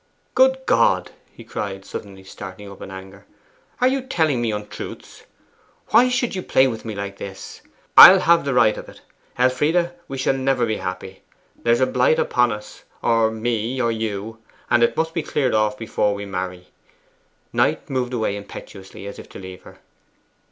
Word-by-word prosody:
Good - - +4
God!' - - +2 0.2
he - - -13
cried, 95 -1 -5
suddenly 95 -2 -8
starting 95 +1 -10
up 100 - -13
in - - -8
anger, 95 +1 -11 0.5
'are 250 - +4
you 265 +1 +1
telling 160 - 0
me 115 - 0
untruths? 105 0 -8 0.6
Why 240 +3 +5
should 245 -1 0
you 185 - -3
play 130 - +3
with 115 -4 -3
me 110 -2 -6
like 100 0 -6
this? 95 -1 -9 0.3
I'll 190 0 +11
have 170 -1 +4
the 140 -2 -1
right 110 -3 +4
of - - -10
it. - - -15 0.4
Elfride, 150 +8 +2 0.2
we 135 - -6
shall 130 - +1
never 135 -2 +1
be 110 -1 -2
happy! 90 +1 -6 0.3
There's 120 +1 +1
a - - +5
blight 130 +4 +2
upon 125 -1 +2
us, 105 0 -8 0.2
or 115 -1 +3
me, 115 +2 -2
or 115 -2 +1
you, 110 0 -4 0.3
and 120 - +4
it 120 - +2
must 160 0 0
be 165 - -1
cleared 140 -3 -1
off 105 -1 +1
before 105 -2 -1
we 100 0 -6
marry.' 90 -2 -5 0.8
Knight - - +1
moved 130 -2 -2
away 110 -3 -1
impetuously 100 -1 -10
as 100 - -8
if - - -12
to - - -11
leave 95 -1 -10
her. - - -15
115 Hz, 180 wpm, -21 LUFS, 100-135 Hz, 0.8 s, I'll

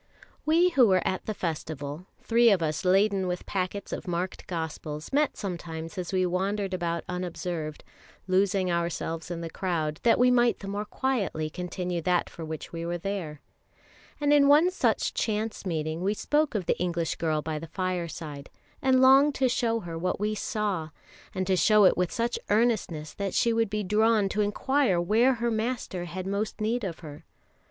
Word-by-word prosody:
We 335 +3 +5
who 265 -8 +5
were 185 -2 +2
at 185 - -3
the 215 - -1
festival, 155 -1 -4 0.2
three 235 +1 +5
of 190 -5 +3
us 155 -1 -1
laden 195 +1 +3
with 180 0 -3
packets 190 +1 -3
of - - -5
marked 175 +1 -3
Gospels, 160 - -5
met 295 +1 +2
sometimes 165 -4 -5
as 180 0 -4
we 185 -1 +2
wandered 190 +2 -1
about 170 -2 -2
unobserved, 175 -3 -4 0.4
losing 190 0 +2
ourselves 170 -1 -2
in 170 -1 -4
the 165 - -5
crowd, 160 -5 -2
that 235 - +4
we 250 0 +5
might 240 -1 +3
the 195 - -9
more 205 +2 -3
quietly 205 -12 -1
continue 180 0 -3
that 180 +1 +1
for 165 - -8
which 160 0 -7
we 165 0 -4
were 170 +1 -2
there; 175 -5 -4 0.8
and 290 0 +3
in 285 -1 +6
one 305 +6 +6
such 370 - +1
chance 215 -2 -2
meeting 160 -1 -2
we 200 +3 0
spoke 295 +2 +1
of 195 -4 -1
the - - 0
English 170 -2 -1
girl 155 -2 0
by 155 -1 -3
the 165 - -8
fireside, 165 -5 -4 0.3
and 260 -1 +4
longed 275 +2 +6
to 265 - +2
show 230 -2 0
her 165 -3 -6
what 180 +2 -1
we 210 +1 0
saw; 205 -6 -2 0.5
and 185 - -1
to 190 0 +2
show 210 +4 +5
it - - +5
with 180 -1 0
such 235 +1 -1
earnestness 205 -9 +1
that 200 -1 -3
she 235 - +3
would 225 -2 +1
be 210 0 -2
drawn 215 +1 +3
to 210 +2 -1
inquire 210 0 +1
where 225 +9 +3
her 235 0 -1
Master 220 -5 -2
had 180 +2 -6
most 200 +4 -2
need 225 +3 0
of 175 -4 -5
her. 150 -3 -10
185 Hz, 185 wpm, -27 LUFS, 170-220 Hz, 0.8 s, in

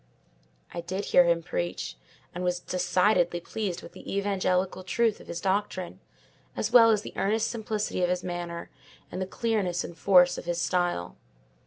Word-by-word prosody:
I 170 - -4
did 185 +4 -4
hear 180 - +5
him 170 -1 +2
preach, 85 - -3 0.4
and 180 - -4
was 180 0 0
decidedly 180 0 +2
pleased 185 0 -4
with - - -10
the 195 - -6
evangelical 185 -2 0
truth 225 +3 +1
of - - -14
his 170 - -4
doctrine, 190 -1 -2 0.6
as - - -1
well 230 -2 +9
as 210 -2 +2
the - - -8
earnest 215 +3 +1
simplicity 215 -4 -2
of 175 - +2
his 180 0 -1
manner, 175 -1 -5 0.4
and 185 - -4
the 185 - -2
clearness 200 -5 -1
and 170 - -8
force 180 +1 +5
of - - -10
his 175 0 -1
style. 175 - -1
180 Hz, 170 wpm, -27 LUFS, 175-200 Hz, 0.6 s, well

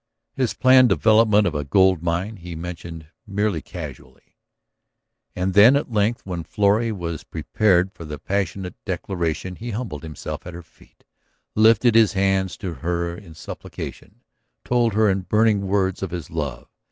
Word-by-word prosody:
His 130 -4 -1
planned 130 -1 +6
development 110 +1 +4
of 90 - 0
a 75 -1 -2
gold 95 +4 +3
mine 90 +6 -2
he 85 -1 -8
mentioned 85 -1 -8 0.2
merely 100 -4 -1
casually. - - -10 1.0
And 90 +1 -1
then 110 +7 +7
at 140 -3 -1
length 110 +2 0
when 90 -3 -4
Florrie 105 +5 +1
was 85 -6 -5
prepared 95 -3 +1
for 85 - -11
the 75 -2 -6
passionate 95 +2 -3
declaration 90 -2 -3
he 120 - -6
humbled 105 - -5
himself 80 +2 -7
at 90 - -8
her 85 - -9
feet, 80 - -25 0.5
lifted 110 +2 +5
his 110 -2 +5
hands 95 -1 0
to 90 -3 -5
her 85 +1 -2
in 85 -4 -13
supplication, - - -9 0.4
told 120 -3 +1
her 110 0 +4
in 95 -1 +1
burning 105 0 +2
words 95 -1 0
of 95 - -3
his 85 -3 -6
love. 70 -6 -4
95 Hz, 155 wpm, -22 LUFS, 85-105 Hz, 1.0 s, then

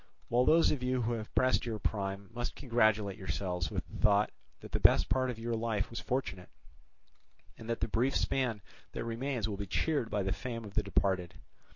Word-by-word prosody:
While 125 +2 +3
those 165 +4 +5
of 140 - -1
you 125 -1 0
who 115 - 0
have 110 -2 -5
passed 130 0 +3
your 110 -2 -2
prime 100 -1 -3
must 120 +1 -3
congratulate 110 -5 +2
yourselves 90 -4 -2
with - - -4
the - - -9
thought 105 0 +4 0.3
that - - -10
the - - 0
best - - +5
part 130 0 +2
of 125 - -4
your 115 +1 -3
life 110 -3 -1
was 115 - -4
fortunate, 110 -9 -3 1.1
and 115 - -10
that 115 - -1
the - - +1
brief 125 +5 +1
span 120 -7 0 0.3
that - - -3
remains 115 0 -2
will 100 -2 -3
be 100 0 -4
cheered 145 - 0
by 100 -1 0
the 95 0 0
fame 115 0 -5
of 100 - -10
the 105 - +2
departed. 95 -3 0
115 Hz, 205 wpm, -32 LUFS, 100-125 Hz, 1.1 s, those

